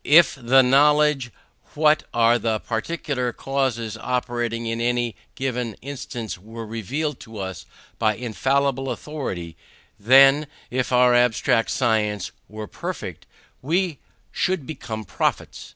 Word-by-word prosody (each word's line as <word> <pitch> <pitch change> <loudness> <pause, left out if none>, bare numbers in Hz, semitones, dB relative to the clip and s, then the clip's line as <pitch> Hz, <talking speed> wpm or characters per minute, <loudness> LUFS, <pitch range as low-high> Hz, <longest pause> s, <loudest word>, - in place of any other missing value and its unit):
If 165 +4 +6
the 130 0 +4
knowledge 145 0 +4 0.5
what 155 0 +3
are 120 +1 +4
the 110 0 0
particular 125 +2 -2
causes 120 -4 -2
operating 120 -2 -2
in 115 0 -2
any 120 -1 0 0.2
given 125 -4 -2
instance 125 -6 -6
were 115 +4 -8
revealed 125 +7 -3
to 110 -2 -11
us 95 -2 -6 0.3
by 110 -2 +2
infallible 135 +4 0
authority, 95 - -5 0.4
then, 135 +6 +6 0.2
if 130 +1 -1
our 125 0 +5
abstract 120 -1 +3
science 105 -6 0 0.2
were 110 0 -6
perfect, - - -6 0.3
we 165 +1 0 0.3
should 185 -7 -1
become 110 -8 -6
prophets. 90 - -2
125 Hz, 120 wpm, -23 LUFS, 115-135 Hz, 0.5 s, If